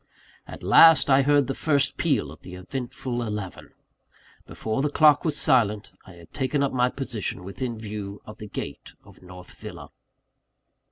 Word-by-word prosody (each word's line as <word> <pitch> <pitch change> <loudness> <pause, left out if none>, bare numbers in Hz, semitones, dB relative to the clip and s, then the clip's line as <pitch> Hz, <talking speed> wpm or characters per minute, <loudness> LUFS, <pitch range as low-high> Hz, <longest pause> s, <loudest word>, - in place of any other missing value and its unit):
At - - -10
last, 145 - +6
I 135 +1 +6
heard 145 0 +3
the 135 - -3
first 140 -1 +1
peal 140 - 0
of 80 - -14
the 90 - -10
eventful 120 +5 -5
eleven. 105 -5 -6 0.8
Before 110 +3 -3
the 150 - 0
clock 150 -1 +4
was 160 - -1
silent, 105 -4 +2
I 95 - -12
had 85 -1 -17
taken 140 +1 -1
up 140 - -1
my 125 -1 +2
position 120 -9 -4
within 115 +6 -5
view 105 -2 -7
of 105 - -12
the 105 - -8
gate - - -7
of - - -18
North 90 0 -12
Villa. - - -10
120 Hz, 165 wpm, -25 LUFS, 100-135 Hz, 0.8 s, last